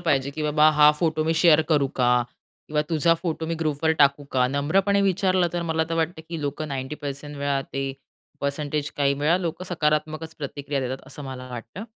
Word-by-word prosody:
पाहिजे, 140 -5 +1
की 155 +2 -5
"बाबा 150 0 +4
हा 150 0 +6
फोटो 160 -2 +1
मी 160 - +2
शेअर 160 -1 +6
करू 150 -4 +3
का? 125 -1 +3 0.6
किंवा 150 0 +1
तुझा 165 +1 +3
फोटो 165 -1 -3
मी 165 - -1
ग्रुपवर 155 0 0
टाकू 140 0 +4
का?" 125 -1 +3
नम्रपणे 190 +9 +2
विचारलं 185 -2 +2
तर 175 -1 -1
मला 160 0 +1
तर 165 - -1
वाटतं, 165 0 -1
की 165 -2 -4
लोकं 145 +2 -3
90% 145 +1 -5
वेळा, 140 -1 0
ते 135 0 -2 0.5
परसेंटेज, 145 +1 -2
काही 140 -1 +2
वेळा 155 +4 +3
लोकं 170 0 -4
सकारात्मकच 155 -1 -1
प्रतिक्रिया 140 -1 -3
देतात, 130 0 -4
असं 140 +1 -8
मला 130 -1 -7
वाटतं. 125 - -7
150 Hz, 185 wpm, -24 LUFS, 140-165 Hz, 0.6 s, हा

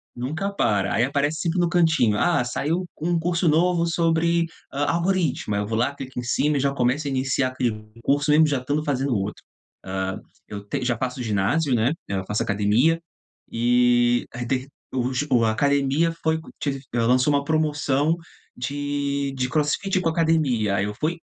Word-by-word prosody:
Nunca 155 +11 -3
para, 100 - +1
aí 115 - +3
aparece 145 +3 -1
sempre 175 +1 -1
no 175 -1 +2
cantinho, 160 -11 +3
"Ah 170 0 +2
saiu 155 +8 -1 0.2
um 170 +2 +1
curso 170 +1 0
novo 170 +2 +3
sobre, 170 0 +2 0.2
ah, 145 +1 -1
algoritmo", 170 - 0
aí 100 - 0
eu 105 - -3
vou 110 0 -1
lá 130 +5 0
clico 130 -2 -7
em - - -4
cima 145 +5 +1
e - - +1
já 140 +1 +1
começo 135 +3 0
a - - -1
iniciar 135 0 0
aquele 115 -5 -3
curso 145 +3 +1
mesmo 155 +2 +6
já 145 -3 +1
estando 145 +4 -2
fazendo 135 -3 0
outro, 100 +2 -4 0.4
ah, 95 0 -3 0.3
eu 100 -1 -7
te 125 - -3
já 120 -2 0
faço 125 +1 -3
ginásio, 115 +8 +1
né, 120 +4 +2 0.2
eu 95 -1 -2
faço 105 - 0
academia, 110 +11 +2 0.5
e 120 0 +3
aí 120 0 -4
tem 130 +2 -1 0.3
o 130 0 -1
ju 145 +4 -1
o, 120 -3 +4
a 110 - +2
academia 140 +6 +2
foi 160 0 +1 0.2
que 140 -2 -2 0.2
lançou 125 +4 +3
uma 140 0 +1
promoção 150 0 +1 0.4
de, 140 +1 -2
de 130 -1 -1
crossfit 155 +7 0
com 165 - +1
academia, 155 -11 +1
aí 95 - +1
eu 105 - -4
fui, 160 +9 -2
140 Hz, 185 wpm, -23 LUFS, 120-160 Hz, 0.5 s, mesmo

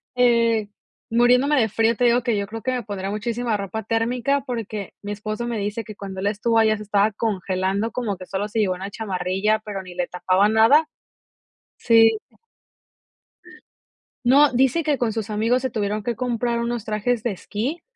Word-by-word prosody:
Eh, 230 -3 +3 0.4
muriéndome 250 +5 +4
de 220 -2 +2
frío 225 +2 +1
te 245 - 0
digo 240 +1 +4
que, 230 -3 0
yo 200 - -1
creo 225 +1 -7
que 255 - -1
me 250 -2 -2
pondré 195 -1 -5
muchísima 230 +1 -2
ropa 200 +3 -4
térmica 240 +5 0
porque, 215 -5 -5
mi 205 0 -6
esposo 215 +3 -4
me 235 -2 -2
dice 210 +3 -3
que 215 0 -10
cuando 195 -2 -7
él 200 - -1
estuvo 225 +2 +1
allá 215 -1 +3
se 210 - -8
estaba 205 +1 +2
congelando, 195 0 -1
como 220 -5 -2
que 185 - -10
solo 200 +2 -2
se 220 +1 -3
llevó 185 -3 +1
una 195 +2 -7
chamarrilla, 195 +1 -1
pero 200 -2 -5
ni 180 -1 -11
le 180 -1 -1
tapaba 185 +3 +2
nada. 230 +8 +5 0.9
Sí. 225 -1 +5 2.1
No, 280 +3 +6
dice 265 +6 +2
que 295 -3 +1
con 230 -3 -1
sus 220 -1 -4
amigos 230 +4 +1
se 260 - -1
tuvieron 210 -1 -2
que 240 +1 -2
comprar 240 -1 -1
unos 235 -1 -3
trajes 220 +2 -1
de 240 - -1
esquí, 235 - -4
220 Hz, 185 wpm, -22 LUFS, 205-240 Hz, 2.1 s, No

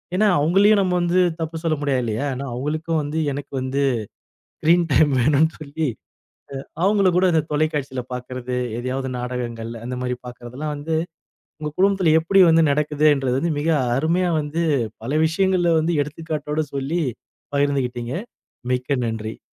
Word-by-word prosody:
ஏன்னா 210 +3 +4
அவங்களையும் 195 +7 +4
நம்ம 185 -2 +1
வந்து 175 +1 +2 0.2
தப்பு 165 0 -3
சொல்ல 165 -2 +1
முடியாது 140 -3 +1
இல்லையா? 115 +2 -2
ஏன்னா 135 +2 -5
அவங்களுக்கு 150 +6 -3
வந்து, 150 +2 -3
எனக்கு 140 +1 -6
வந்து 130 +2 -1 0.8
ஸ்க்ரீன் 170 +2 +4
டைம் 155 - +5
வேணும்னு 150 +5 +4
சொல்லி 155 +1 -3 0.7
அ. - - -12 0.2
அவங்கள 200 -1 +4
கூட 185 - +4
அந்தத் 160 -1 +1
தொலைக்காட்சில 145 -4 -1
பாக்கறது, 125 0 -5 0.2
எதையாவது 130 +2 -3
நாடகங்கள், 120 -2 -4
அந்த 125 +1 -4
மாரி 125 0 -1
பாக்கறது 120 0 -10
எல்லாம் 150 0 -2
வந்து, 150 +3 -3 0.7
உங்க 150 -1 -4
குடும்பத்துல 190 -4 +3
எப்படி 190 +4 +4
வந்து 165 0 +5
நடக்குது 150 +1 +1
என்றது 135 -2 -1
வந்து 170 +1 0
மிக 155 - -1 0.3
அருமையா 170 +5 +1
வந்து, 155 +3 -2 0.4
பல 130 - -3
விஷயங்கள்ல 175 +1 +2
வந்து 165 +2 0
எடுத்துக்காட்டோட 150 0 -3
சொல்லி 140 +5 -1 0.5
பகிர்ந்துகிட்டீங்க. 130 -4 -1 0.6
மிக்க 125 +3 0
நன்றி. 110 -1 -4
150 Hz, 145 wpm, -22 LUFS, 130-165 Hz, 0.8 s, டைம்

